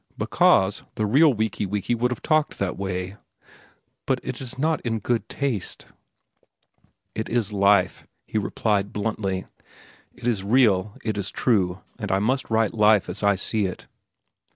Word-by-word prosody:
"Because 95 +1 +3
the 110 - 0
real 145 +9 +5
Wiki 110 -3 -1
Wiki 105 +4 -1
would 120 +1 +1
have 125 - -5
talked 155 -1 +1
that 100 -2 -2
way." 95 0 -4 0.9
"But - - +1
it - - -5
is 130 -1 -6
not 155 +3 0 0.2
good 120 -2 -1
taste." 130 -9 -3 1.3
"It 110 - -4
is 115 -3 0
life," 100 0 +2 0.2
he 110 - -1
replied 100 -1 -1
bluntly. 100 -3 -2 0.7
"It - - -11
is 110 -6 0
real. 105 -3 +3
It 110 -2 -2
is 100 +1 -2
true. 95 -8 +1 0.2
And 105 -3 -3
I 95 - +3
must 125 +7 0
write 110 -1 +2
life 105 -3 +4
as 95 - -4
I 100 -1 +3
see 100 +2 -1
it." 90 - -8
105 Hz, 155 wpm, -24 LUFS, 100-120 Hz, 1.3 s, real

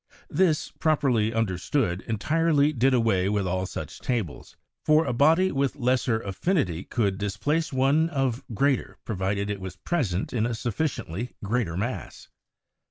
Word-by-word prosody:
This, 165 -2 +2
properly 135 -9 +2
understood, 100 -1 0
entirely 150 +6 +2
did 130 0 +3
away 110 -7 +2
with 100 -2 0
all 95 +1 -1
such - - -7
tables, 115 - -3 0.3
for 155 +1 +4
a - - -1
body 160 +9 +4
with 140 -1 0
lesser 125 -3 +1
affinity 100 - -1
could 100 -5 -1
displace 150 +11 -1
one 140 +5 +3
of 135 -4 -1
greater, 135 +3 0
pro 110 - -3
vided 100 +2 -1
it 100 -2 -5
was 95 -1 -6
present 105 - -2
in 115 -2 +1
a 120 - -2
sufficiently 120 - -3
greater 105 -5 -1
mass. 120 +6 -5
120 Hz, 145 wpm, -26 LUFS, 100-145 Hz, 0.3 s, for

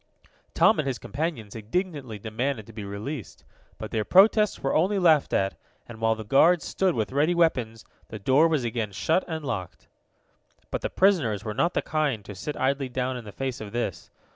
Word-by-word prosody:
Tom 220 - +5
and 150 - -1
his 130 -2 -1
companions 140 -9 -4
indignantly 130 - -3
demanded 110 +3 -3
to 115 - -14
be 105 -1 -7
released, 105 +6 -7 0.3
but - - -7
their 110 -1 0
protests 210 - +5
were 135 - 0
only 190 +6 +2
laughed 160 -6 +4
at, 95 0 0 0.3
and 115 -1 -11
while 110 0 +2
the 110 - -7
guards 160 +9 +4
stood 190 -3 0
with 110 0 -1
ready 150 +6 +2
weapons 125 -10 0 0.2
the 110 - -7
door 130 +10 +4
was 155 -5 0
again 115 -3 -2
shut 160 - +1
and 160 -3 -5
locked. 95 -8 -5 0.8
But - - -2
the - - -2
prisoners 140 - +2
were 105 - -3
not 155 +10 0
the - - +1
kind 145 -10 -1
to 105 - -8
sit 145 +10 -6
idly 135 0 0
down 130 +1 -2
in 120 -2 -7
the 105 - -8
face 130 +2 -4
of 105 -1 -8
this. 120 0 -3
130 Hz, 195 wpm, -26 LUFS, 110-160 Hz, 0.8 s, Tom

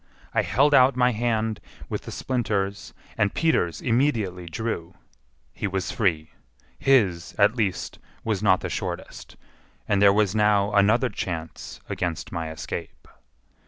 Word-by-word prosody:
I - - +3
held 145 +4 +2
out 130 -1 +6
my 125 0 +3
hand 110 -2 -1 0.3
with - - -5
the - - -7
splinters, 100 -6 -2 0.3
and 105 -1 +1
Peters 160 - +1
immediately 115 -9 0
drew. 90 -3 -4 0.6
He 105 - -3
was 95 -1 -2
free—his, 85 - -1
at 105 +2 +4
least, 105 -6 -2 0.2
was 110 -4 -1
not 95 -3 +3
the - - -3
shortest; - - -6 0.5
and 100 -1 +2
there 100 -1 +7
was 100 -1 +2
now 105 -1 +2
another 110 +5 +4
chance 85 -6 -6
against 85 -3 -3
my 80 -1 -3
escape. 80 - -7
105 Hz, 130 wpm, -25 LUFS, 90-115 Hz, 0.6 s, there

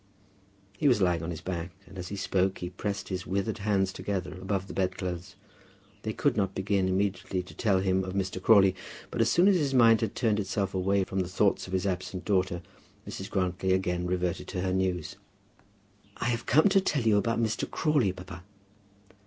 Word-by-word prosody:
He 150 - +3
was 125 -5 +4
lying 90 -4 +2
on 80 - -4
his 85 -3 -5
back, 90 -1 -4 0.2
and 95 - -15
as 90 - -5
he 100 - -5
spoke 95 -1 0
he 90 0 -5
pressed 100 +1 -4
his 90 -2 -4
withered 100 +3 -1
hands 100 -2 +1
together 95 -3 -3
above 95 0 -1
the - - -9
bedclothes. 95 0 -3 0.7
They 110 - -3
could 145 +6 +1
not 95 -3 0
begin 95 -1 +1
immediately 95 -1 -1
to 90 - -13
tell 100 -5 +1
him 95 0 +1
of 95 0 -5
Mr. 95 -1 -2
Crawley, 95 -3 +6 0.4
but 120 - -1
as 115 - +3
soon 175 +3 +4
as 200 -2 +5
his 140 -5 0
mind 115 -2 +6
had 110 -3 -2
turned 110 -4 +1
itself 95 -1 -2
away 95 +1 +1
from 95 +1 -3
the 90 - 0
thoughts 95 +1 +1
of 90 - -8
his 95 +1 0
absent 90 -1 -3
daughter, 95 -4 0 0.4
Mrs. 95 - -6
Grantly 95 0 0
again 90 -1 0
reverted 90 -1 -1
to 95 -2 -3
her 90 0 0
news. 90 -4 -1 1.0
"We 120 - 0
have 120 -1 -2
come 155 +9 +5
to 195 0 +4
tell 150 -8 0
you 110 -2 +4
about 115 +3 +1
Mr. 110 -1 -1
Crawley, 145 - +2
papa." 90 -1 -10
95 Hz, 200 wpm, -28 LUFS, 90-105 Hz, 1.0 s, Crawley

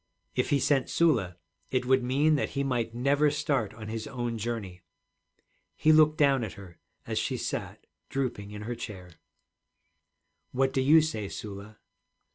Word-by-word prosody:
If - - 0
he 140 - +3
sent 135 -2 +2
Sula, 110 - +2 0.3
it 130 -1 0
would 130 +1 +4
mean 140 +5 +3
that 145 - +1
he 140 - +2
might 120 -4 -1
never 140 +4 +3
start 140 -7 0
on 110 -1 -8
his 110 0 -4
own 120 -3 -3
journey. 105 -5 -4 0.9
He 155 - +4
looked 155 0 +5
down 140 -4 +4
at 110 - -5
her, 95 -4 -13 0.3
as - - -1
she - - -1
sat - - -5 0.2
drooping 125 -7 -3
in 105 0 -7
her 120 +3 -3
chair. 95 -6 -8 1.4
'What 135 +1 +1
do 130 - +2
you 155 +5 +6
say, 110 -11 -3
Sula?' 105 +1 -8
125 Hz, 160 wpm, -28 LUFS, 105-140 Hz, 1.4 s, you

